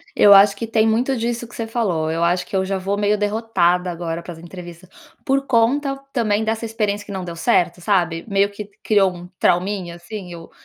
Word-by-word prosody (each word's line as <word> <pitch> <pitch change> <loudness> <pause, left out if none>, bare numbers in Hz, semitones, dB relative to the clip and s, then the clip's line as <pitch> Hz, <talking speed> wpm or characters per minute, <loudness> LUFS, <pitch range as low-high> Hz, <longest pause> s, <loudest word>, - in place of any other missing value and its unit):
Eu 205 - +6
acho 200 0 +7
que 230 +2 -5
tem 220 0 +2
muito 245 +4 +1
disso 235 +1 -3
que - - -14
você 230 - -3
falou, 185 -9 -1
eu 165 +1 -1
acho 175 +1 +1
que - - -7
eu 190 - +2
já 195 0 -2
vou 195 +2 -2
meio 210 0 +1
derrotada 200 -4 +1
agora 170 0 -4
para 175 - -9
as - - -14
entrevistas, 175 0 -11 0.4
por 275 +1 0
conta 270 +4 +2 0.2
também 220 -4 +1
dessa 225 +1 -2
experiência 210 -2 -2
que 205 - -10
não 190 -2 -4
deu 170 -1 -6
certo, 175 -3 +1
sabe, 175 -4 0
meio 200 0 +2
que 205 0 -8
criou 200 -3 +3
um 175 0 -10
trauminha, 180 -1 0
assim. 180 +1 -8
Eu 165 -1 -10
200 Hz, 215 wpm, -20 LUFS, 175-225 Hz, 0.4 s, acho